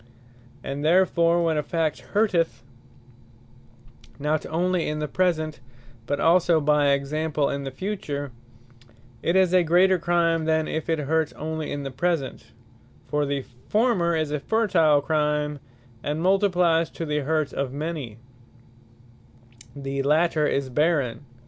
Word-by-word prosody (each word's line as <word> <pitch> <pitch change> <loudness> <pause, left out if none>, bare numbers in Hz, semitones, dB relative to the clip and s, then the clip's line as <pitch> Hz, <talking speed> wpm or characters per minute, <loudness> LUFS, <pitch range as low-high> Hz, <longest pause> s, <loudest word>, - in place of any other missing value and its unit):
And 140 +1 -4
therefore, 170 0 +3
when 160 -2 +1
a - - +2
fact 160 -1 -1 0.2
hurteth, 185 - +1 1.5
not 150 +2 -1
onely 175 +1 0
in 150 - -3
the 150 0 -2
present, 155 -2 -1 0.5
but 145 - -1
also, 170 -1 +4
(by 150 -1 +3
example) 145 +1 -1
in 140 0 -4
the - - -3
future, 145 -4 -4 0.9
it 170 - 0
is 185 -1 +3
a 185 - +6
greater 180 +3 +3
Crime, 165 -1 +1
than 160 0 +1
if 160 +1 -4
it 165 - +2
hurt 155 +1 0
onely 160 0 -4
in 145 0 -4
the 135 - -5
present: 155 0 -2 0.6
for 150 -1 -1
the 140 -1 -2 0.2
former, 210 -7 +2
is 155 -2 -1
a 150 - -1
fertile 165 -7 +2
Crime, 150 0 0 0.4
and 150 +4 -3
multiplyes 180 -3 +2
to 165 - -5
the 150 -1 -1
hurt 155 0 -1
of 140 -2 -2
many; 145 -6 -5 1.6
the 140 0 -3
later 155 +2 +2
is 135 -2 -1
barren. 150 -3 0
155 Hz, 135 wpm, -24 LUFS, 145-170 Hz, 1.6 s, a